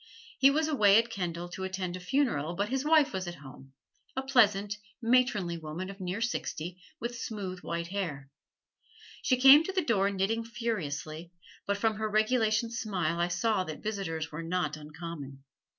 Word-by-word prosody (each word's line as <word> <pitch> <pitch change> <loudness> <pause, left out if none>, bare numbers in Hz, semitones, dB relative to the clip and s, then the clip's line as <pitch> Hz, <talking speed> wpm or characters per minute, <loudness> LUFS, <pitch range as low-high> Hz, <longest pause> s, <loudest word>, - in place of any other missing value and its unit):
He 270 - +7
was 310 +3 +1
away 210 -10 +5
at 230 +1 +2
Kendal 175 -3 -3
to 190 +2 -6
attend 185 -1 -3
a - - -6
funeral, 180 - 0
but 200 +3 -1
his 265 +1 -1
wife 305 -1 +4
was 190 -1 -3
at 175 - -5
home 135 -1 -13 0.4
a 265 - -1
pleasant, 210 -6 +3 0.2
matronly 230 -8 +2
woman 165 +5 -5
of 200 - -13
near 185 +4 -3
sixty, 180 -7 -3 0.2
with 240 +1 -4
smooth, 195 -6 -5
white 170 -1 -4
hair. 150 -9 -4 0.9
She 255 - +2
came 270 +4 +9
to 385 - -3
the 375 -4 0
door 200 -6 +2
knitting 200 +4 0
furiously, 175 -8 -4 0.4
but 200 0 +1
from 220 +1 +1
her 215 0 -1
regulation 220 +1 +2
smile 205 -7 -1
I 175 - +2
saw 185 +3 +1
that 155 -2 -7
visitors 180 -7 -3
were 155 +2 -5
not 165 -2 -1
uncommon. 150 -3 -8
195 Hz, 170 wpm, -30 LUFS, 170-230 Hz, 0.9 s, came